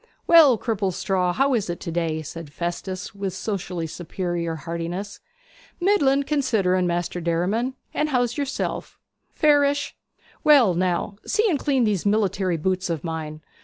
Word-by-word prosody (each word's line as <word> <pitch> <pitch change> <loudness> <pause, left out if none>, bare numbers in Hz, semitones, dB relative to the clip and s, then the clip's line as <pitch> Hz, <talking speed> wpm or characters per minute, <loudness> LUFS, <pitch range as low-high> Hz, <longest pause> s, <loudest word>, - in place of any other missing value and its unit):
'Well, 310 -8 +7
Cripplestraw, 190 -4 0
how 275 +1 +2
is 215 -7 0
it 175 - -3
to 170 - -4
day?' 160 -2 -1
said 160 0 -8
Festus, 175 +3 -4
with 195 -2 -4
socially 180 -5 -3
superior 170 0 -3
heartiness. 170 +5 -5 0.6
'Middlin', 290 -8 +3
considering, 210 -11 +1
Maister 175 0 -2
Derriman. 190 +10 0 0.2
And 305 0 0
how's 245 -3 +1
yerself?' 280 -1 -3 0.4
'Fairish. 285 -2 +3 0.5
Well, 275 -11 +6
now, 185 +3 -1
see 435 +2 +2
and 295 - 0
clean 270 -3 +1
these 210 -5 +1
military 195 -4 +1
boots 185 +3 -1
of 165 -4 -2
mine. 155 -2 -5
190 Hz, 135 wpm, -23 LUFS, 170-260 Hz, 0.6 s, Well